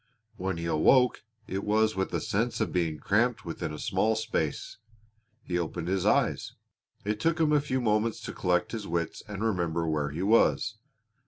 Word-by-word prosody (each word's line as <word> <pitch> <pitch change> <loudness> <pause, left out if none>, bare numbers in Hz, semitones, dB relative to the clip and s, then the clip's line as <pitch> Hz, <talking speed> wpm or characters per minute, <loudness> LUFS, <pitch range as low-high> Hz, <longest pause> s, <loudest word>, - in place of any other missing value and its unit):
When 95 -1 -3
he 85 - -4
awoke 125 +11 +4 0.2
it 95 -1 -4
was 110 +1 +2
with 95 0 -1
a - - 0
sense 115 +2 -1
of - - -1
being 85 -4 0
cramped 115 +6 +1
within 80 -2 -4
a 75 - -6
small 110 +8 +1
space. 110 -9 -2 0.7
He 90 -1 -1
opened 85 0 -3
his 95 -1 0
eyes. - - +1 0.5
It 105 0 -1
took 165 +6 +1
him 155 -2 +3
a 150 - +4
few 130 -3 -1
moments 110 -1 +1
to - - -6
collect 90 -1 0
his 110 -3 -5
wits 85 0 -2
and 105 0 -5
remember 85 -6 0
where 75 -2 0
he 80 +6 -4
was. 110 +1 +3
100 Hz, 180 wpm, -28 LUFS, 85-110 Hz, 0.7 s, awoke